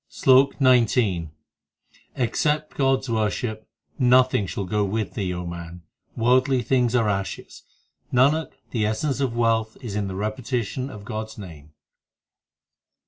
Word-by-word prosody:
SLOK 135 +1 +4
XIX 115 - +3 0.9
Except 150 +5 0
God 135 -1 +2
s 135 - -8
worship 110 0 -2 0.3
nothing 125 -5 +4
shall 95 +4 -4
go 105 +3 0
with 100 -1 -2
thee, 95 -3 -2
man; 85 0 -8 0.3
worldly 130 +2 +3
things 125 0 +1
are 115 -3 +2
ashes: 100 -1 -4 0.5
Nanak, 145 +6 +3 0.2
the 115 -3 -1
essence 135 +6 -1
of 125 -4 -1
wealth 115 -1 +1
is 115 -5 -7
the 100 -2 -3
repetition 115 +4 -3
of 105 -5 -10
God 110 +1 -4
s 110 - -13
name. 80 -7 -11
115 Hz, 130 wpm, -24 LUFS, 100-130 Hz, 0.9 s, SLOK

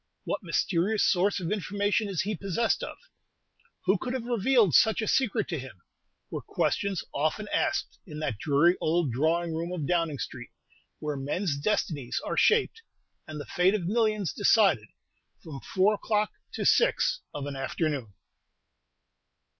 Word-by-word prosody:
What - - -3
mysterious 185 +3 +1
source 195 +2 +2
of 175 -1 -4
information 205 +1 0
is 190 -5 -1
he 210 +2 -2
possessed 195 +5 0
of? - - -6 0.9
Who 190 +1 +3
could 250 - -4
have 255 -3 -3
revealed 235 - +3
such 220 - +5
a 220 - -1
secret 230 -5 +1
to 165 -5 -2
him? 125 -8 -11 0.5
were - - -4
questions 195 -5 -1
often 155 +9 -1
asked 315 0 -1
in 150 -3 -8
that 135 -9 -3
dreary 160 +6 +3
old 160 -3 +1
drawing 160 +6 0
room 165 +2 -3
of 170 -5 -3
Downing 165 -3 0
Street, 120 -1 -6 0.5
where 150 -2 -4
men's 145 +4 -1
destinies 145 - -1
are - - -2
shaped, 455 0 +3 0.5
and 155 -1 -7
the - - -6
fate 185 +3 +2
of 190 -5 -2
millions 215 - +1
decided, 195 - +3 0.6
from 145 -4 -8
four 195 +3 +2
o'clock 210 0 0 0.2
to - - -3
six - - +3
of 145 -1 -5
an 145 -1 -5
afternoon. 135 - -2
180 Hz, 155 wpm, -28 LUFS, 150-210 Hz, 0.9 s, such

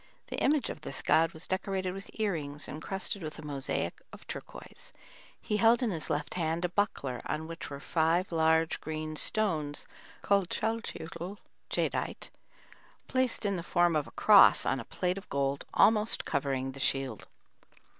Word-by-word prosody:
The - - -3
image 290 -3 +2
of - - -9
this 135 - -6
god 165 0 +4
was 160 +1 -7
decorated 190 0 -2
with 195 +1 -9
ear 215 -2 +1
rings 145 -2 -5
encrusted 190 +5 -4
with 155 -2 -6
a 155 - -9
mosaic 135 - -3
of - - -12
turquoise. - - -9 0.5
He 210 - -1
held 230 +3 +5
in 230 - +1
his 160 -4 -4
left 150 -1 -1
hand 165 0 -1
a - - 0
buckler 170 - -1
on 155 +1 -2
which 165 -1 -7
were 140 -1 -6
five 165 +5 +1
large 160 0 +2
green 155 0 -4
stones 155 -7 +1 0.4
called 200 -3 +2
chalchiuitl 205 -5 -3 0.3
(jadeite), - - -2 0.8
placed 255 -3 0
in 200 -2 +1
the - - -3
form 175 -1 +2
of 150 -2 0
a - - -12
cross - - +7
on - - +1
a - - -7
plate 180 +1 -1
of - - -18
gold 140 0 -1
almost 215 0 +4
covering 135 -2 -1
the 135 - -11
shield. 135 -5 -1
165 Hz, 165 wpm, -30 LUFS, 150-195 Hz, 0.8 s, cross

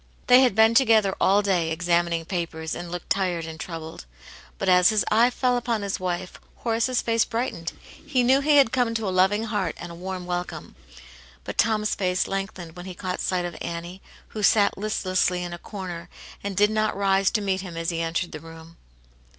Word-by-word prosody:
They 250 +1 +7
had 250 -7 +3
been 220 +1 +5
together 225 -5 +4
all 200 +2 +4
day, 180 -5 +1
examining 170 0 0
papers, 165 -3 -4
and 175 0 -6
looked 175 -1 -7
tired 180 -4 0
and 160 0 -8
troubled. 160 - -7 0.5
But 195 - -3
as 180 -1 +6
his 215 -1 +1
eye 230 +3 +5
fell 250 0 +1
upon 230 -3 -1
his 200 0 -2
wife, 180 0 -4 0.2
Horace's 235 +2 0
face 230 -1 +2
brightened; 225 -8 -3 0.3
he 255 -4 +1
knew 260 +3 +4
he 295 +1 +4
had 270 -5 +5
come 245 -3 +1
to 225 -2 -1
a - - 0
loving 190 +4 +3
heart 210 -5 -2
and 175 0 -8
a - - -8
warm 185 +1 -6
welcome. 180 0 -5 0.7
But - - -7
Tom*s 215 -1 +2
face 185 -2 0
lengthened 195 -4 -5
when 180 +1 -9
he 185 - -7
caught 180 0 -4
sight 180 -1 0
of 175 -2 -5
Annie, 170 +3 -6 0.3
who 215 - -6
sat 205 0 +4
listlessly 185 -3 0
in 175 -1 -5
a 175 - -7
corner, 180 -4 -7 0.3
and 200 -2 -4
did 210 +1 +4
not 215 -2 0
rise 195 -1 +3
to 215 - -1
meet 190 -2 -1
him 180 -3 -8
as 165 +1 -1
he 165 0 -2
entered 165 +2 -2
the 155 - -7
room. 165 +1 -13
190 Hz, 200 wpm, -25 LUFS, 175-215 Hz, 0.7 s, They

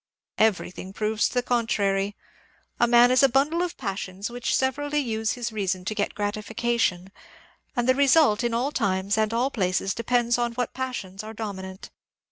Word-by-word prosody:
Everything 190 -3 0
proves 215 +1 0
the 245 -1 -1
contrary. 205 -5 0 0.6
A 240 - +4
man 240 +1 +6
is 255 - +5
a 275 - +6
bundle 290 +7 +2
of 355 -1 -3
passions 195 -2 -4
which 245 0 -1
severally 290 +3 0
use 225 -5 0
his 240 -2 -4
reason 190 -4 -2
to 215 - -2
get 205 -1 -2
gratification, 210 -2 -1 0.6
and 240 -1 0
the 255 - +6
result 275 -4 +4
in 240 - 0
all 255 +5 0
times 200 -5 0
and 215 0 +1 0.2
places 190 -1 0
de 230 - -5
pends 240 0 +2
on 240 -1 0
what 245 0 -2
passions 245 -8 -5
are 220 +1 -8
dominant. 190 -3 -7
225 Hz, 165 wpm, -25 LUFS, 200-245 Hz, 0.6 s, man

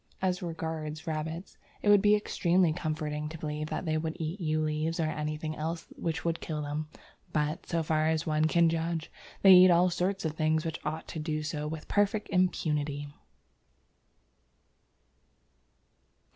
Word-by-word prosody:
As 185 -1 0
regards 160 -2 -4
rabbits, 160 +3 -4 0.2
it 205 - +3
would 205 -1 +7
be 210 +1 +5
extremely 180 -4 +2
comforting 155 -2 -3
to 160 - -7
believe 150 0 -4
that - - -3
they 155 -1 +1
would 160 0 -3
eat 165 +4 -3
yew 155 -1 +1
leaves 155 +2 -1
or - - +2
anything 155 0 -3
else 165 +2 -4
which 165 0 -3
would 165 -1 0
kill 150 -2 -3
them, 150 +1 -3 0.4
but, 150 +1 -1
so 165 -1 0
far 155 0 +1
as 160 0 +1
one 155 0 +2
can 170 +1 +4
judge, 165 0 -2 0.3
they 195 - +9
can 185 - +11
eat 185 +1 +8
all 175 +1 +4
sorts 190 +2 -1
of 160 - +1
things 155 0 +1
which 160 -1 -4
ought 155 +1 -4
to 160 - -5
do 155 0 -2
so 150 -1 -3
with 155 0 -6
perfect 205 +1 +1
impunity. 150 -6 0
160 Hz, 165 wpm, -30 LUFS, 155-170 Hz, 0.4 s, can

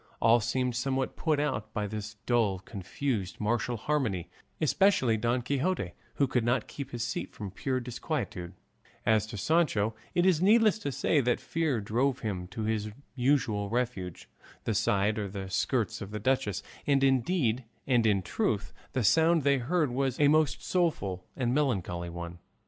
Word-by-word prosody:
All 115 +1 +5
seemed 125 +2 -1
somewhat 130 +1 -1
put 155 -3 +1
out 125 -8 -1
by 105 -2 0
this 105 +1 -5
dull, 115 -6 +2
confused, 95 +2 -4
martial 120 +2 0
harmony, 110 - -1 0.3
especially 155 - +3
Don 120 +3 0
Quixote, 140 - -1 0.2
who 140 - +3
could 125 -3 0
not 120 +2 +1
keep 140 -2 -7
his 120 -3 -3
seat 120 - -3
from 100 -3 -6
pure 130 +6 -1
disquietude; 120 - -4 0.5
as 110 -2 +3
to 105 - -7
Sancho, 115 - +2 0.2
it 175 - +3
is 180 -4 +4
needless 215 +2 +5
to 145 - -3
say 145 +2 +2
that 125 -1 +1
fear 160 -7 -1
drove 125 +6 0
him 95 -5 -3
to 105 +5 -5
his 110 -1 -1 0.2
usual 120 -6 +1
refuge, 115 -7 -3 0.4
the 115 - 0
side 105 0 +1
or 105 - -2
the 95 -1 -6
skirts 110 +1 0
of 100 - -5
the 105 0 -4
duchess; 105 -5 0 0.2
and 140 -1 +3
indeed 130 -2 +2 0.2
and 120 -4 +3
in 100 -3 +2
truth - - -1 0.2
the 130 - 0
sound 160 - +4
they 140 -1 +3
heard 150 +2 +1
was 130 0 -1
a 145 -1 +6
most 155 -1 +2
doleful 100 - 0
and 125 -2 0
melancholy 95 - 0
one. 85 0 -7
120 Hz, 165 wpm, -29 LUFS, 105-140 Hz, 0.5 s, a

